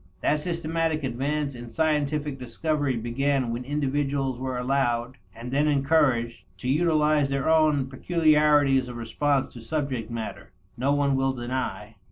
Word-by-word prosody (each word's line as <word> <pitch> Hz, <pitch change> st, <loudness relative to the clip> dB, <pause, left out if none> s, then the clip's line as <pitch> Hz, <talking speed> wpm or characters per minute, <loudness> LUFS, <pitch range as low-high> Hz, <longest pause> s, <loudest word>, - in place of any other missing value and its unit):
That 150 Hz, -, +2 dB
systematic 165 Hz, -1 st, -1 dB
advance 140 Hz, +3 st, -2 dB
in 120 Hz, -1 st, -9 dB
scientific 150 Hz, 0 st, 0 dB
discovery 140 Hz, +2 st, -1 dB
began 125 Hz, +2 st, 0 dB
when 120 Hz, +2 st, -4 dB
individuals 140 Hz, -2 st, -1 dB
were 130 Hz, -1 st, -3 dB
allowed, 125 Hz, -1 st, 0 dB, 0.2 s
and 120 Hz, +2 st, -7 dB
then 145 Hz, +3 st, +2 dB
encouraged, 135 Hz, -5 st, +2 dB, 0.2 s
to 110 Hz, -, -6 dB
utilize 150 Hz, -1 st, +2 dB
their 135 Hz, 0 st, -1 dB
own 155 Hz, -4 st, +3 dB
peculiarities 150 Hz, -2 st, +3 dB
of 120 Hz, -1 st, -7 dB
response 140 Hz, +4 st, 0 dB
to 120 Hz, -, -10 dB
subject 130 Hz, -3 st, -3 dB
matter, 115 Hz, -2 st, -6 dB, 0.2 s
no 130 Hz, +4 st, 0 dB
one 145 Hz, -1 st, +2 dB
will 135 Hz, 0 st, +1 dB
deny. 120 Hz, -4 st, -4 dB
140 Hz, 140 wpm, -26 LUFS, 125-150 Hz, 0.2 s, own